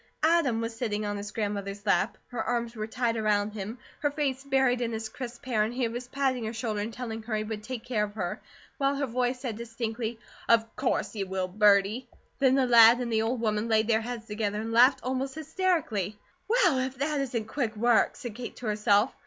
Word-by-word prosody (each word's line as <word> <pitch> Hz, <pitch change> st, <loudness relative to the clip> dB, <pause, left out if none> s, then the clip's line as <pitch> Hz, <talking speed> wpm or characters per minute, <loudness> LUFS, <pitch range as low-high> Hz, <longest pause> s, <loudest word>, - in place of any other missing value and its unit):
Adam 310 Hz, -8 st, +3 dB
was 230 Hz, 0 st, -3 dB
sitting 215 Hz, -3 st, -2 dB
on 205 Hz, 0 st, -2 dB
his 205 Hz, 0 st, -5 dB
grandmother's 200 Hz, -1 st, -3 dB
lap. 205 Hz, +1 st, +2 dB
Her 245 Hz, -2 st, -3 dB
arms 235 Hz, -1 st, -2 dB
were 215 Hz, -1 st, -4 dB
tight 235 Hz, 0 st, 0 dB
around 210 Hz, -1 st, +1 dB
him, 215 Hz, +3 st, -5 dB, 0.2 s
her 290 Hz, -, +1 dB
face 280 Hz, -3 st, -2 dB
buried 265 Hz, -3 st, +2 dB
in 235 Hz, -1 st, -1 dB
his 220 Hz, 0 st, -4 dB
crisp 245 Hz, +1 st, -8 dB
hair, 235 Hz, -4 st, +1 dB
and 215 Hz, +2 st, +1 dB
he 245 Hz, -1 st, 0 dB
was 240 Hz, +2 st, -5 dB
patting 265 Hz, -2 st, 0 dB
her 220 Hz, -, -3 dB
shoulder 220 Hz, -3 st, -2 dB
and 210 Hz, +3 st, -3 dB
telling 225 Hz, -2 st, -5 dB
her 220 Hz, 0 st, -3 dB
he 215 Hz, -, -1 dB
would 215 Hz, -1 st, -5 dB
take 240 Hz, +1 st, -6 dB
care 225 Hz, -4 st, 0 dB
of 205 Hz, 0 st, -11 dB
her, 180 Hz, -5 st, -3 dB, 0.4 s
while 275 Hz, 0 st, +2 dB
her 280 Hz, 0 st, 0 dB
voice 250 Hz, 0 st, -1 dB
said 235 Hz, -6 st, -4 dB
distinctly: 230 Hz, 0 st, -4 dB, 0.3 s
"Of 225 Hz, -1 st, +3 dB
course 205 Hz, -1 st, 0 dB
you 200 Hz, -3 st, -3 dB
will, 190 Hz, -1 st, -2 dB
birdie!" 210 Hz, +5 st, +3 dB, 0.3 s
Then 265 Hz, -1 st, +4 dB
the 270 Hz, -1 st, +3 dB
lad 235 Hz, -1 st, +8 dB
and 240 Hz, -2 st, -2 dB
the 220 Hz, -, +3 dB
old 230 Hz, +2 st, -1 dB
woman 215 Hz, 0 st, 0 dB
laid 220 Hz, -1 st, +3 dB
their 225 Hz, -1 st, +3 dB
heads 235 Hz, -1 st, -5 dB
together 210 Hz, -1 st, -2 dB
and 225 Hz, +1 st, -4 dB
laughed 245 Hz, +4 st, +5 dB
almost 260 Hz, +1 st, -2 dB
hysterically. 310 Hz, -, -1 dB, 0.3 s
"WELL, 405 Hz, -, +3 dB
IF 260 Hz, 0 st, -2 dB
THAT 290 Hz, +2 st, 0 dB
ISN'T 245 Hz, -5 st, -2 dB
QUICK 230 Hz, -3 st, -2 dB
WORK!" 235 Hz, +1 st, +3 dB
said 245 Hz, -6 st, -7 dB
Kate 240 Hz, +2 st, -7 dB
to 245 Hz, -, -9 dB
herself. 210 Hz, -1 st, +3 dB
230 Hz, 220 wpm, -28 LUFS, 215-255 Hz, 0.4 s, lad